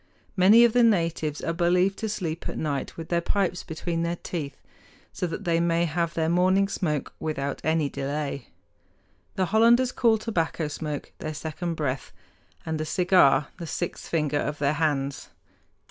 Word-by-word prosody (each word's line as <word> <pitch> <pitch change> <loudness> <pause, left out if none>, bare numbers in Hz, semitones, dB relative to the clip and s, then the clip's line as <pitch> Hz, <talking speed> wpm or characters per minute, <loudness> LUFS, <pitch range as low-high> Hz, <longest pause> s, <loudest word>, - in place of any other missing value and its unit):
Many 210 +5 +7
of 235 - +2
the 245 - +4
natives 165 -9 +1
are 165 - -1
believed 180 +3 +2
to 220 - -2
sleep 170 -6 -4
at - - -5
night 145 -3 -3
with 165 -1 -7
their 170 -1 +1
pipes 185 0 0
between 165 0 -3
their 170 +1 -1
teeth, 150 -5 -5 0.6
so 180 - -2
that 170 +5 -5
they 170 -3 +1
may 170 0 +2
have 170 +1 -1
their 160 -1 +1
morning 185 +3 +3
smoke 155 -7 -2
without 140 -3 -3
any 160 -1 +1
delay. 140 -1 -4 0.9
The 190 - +1
Hollanders 235 +5 +4
call 230 -2 +3
tobacco 170 -7 -1
smoke 150 -1 -5
their 155 0 -5
second 165 +2 -4
breath, 140 -4 -3 0.5
and 160 -1 -2
a - - 0
cigar 180 -4 +4
the 170 - -6
sixth 175 +2 -4
finger 150 -3 0
of 150 +1 -2
their 145 0 +1
hands. 145 -3 -1
165 Hz, 165 wpm, -26 LUFS, 150-185 Hz, 0.9 s, Many